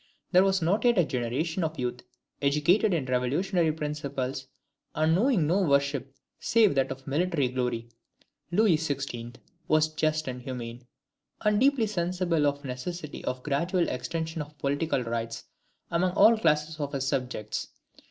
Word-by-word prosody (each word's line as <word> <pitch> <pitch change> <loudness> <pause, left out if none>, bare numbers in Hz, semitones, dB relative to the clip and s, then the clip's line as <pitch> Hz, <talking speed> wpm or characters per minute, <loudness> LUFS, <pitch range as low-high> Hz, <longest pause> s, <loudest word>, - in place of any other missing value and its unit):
There 185 0 +6
was 195 -2 +2
not 185 +6 +1
yet 240 -2 +4
a 175 - +5
generation 145 +8 -2
of 160 0 -2
youth 125 -1 -3 0.4
educated 150 +10 +3
in 160 -7 0
revolutionary 155 +8 +1
principles, 140 -3 -4 0.5
and 155 +1 +3
knowing 205 - +3
no 180 +6 +2
worship 140 -4 +1 0.2
save 220 -5 +4
that 135 -1 +1
of 135 0 -7
military 150 -2 0
glory, 125 -2 -2 0.6
Louis 190 -2 +4
XVI. 135 -6 -4 0.3
was 155 0 +3
just 155 0 0
and 125 -1 -4
humane, 120 -1 -7 0.5
and 210 -1 +2
deeply 270 -2 +3
sensible 175 -5 0
of 145 0 -2
the - - -6
necessity 150 +5 -6
of 125 0 -3
a - - -28
gradual 170 +5 0
extension 160 +6 -3
of 150 0 -9
political 140 -1 0
rights 115 -1 -4 0.5
among 175 +2 +1
all 225 +4 +7
classes 155 -5 +1
of 145 0 -3
his 135 -1 -1
subjects. 125 -6 -2
150 Hz, 150 wpm, -28 LUFS, 130-175 Hz, 0.6 s, all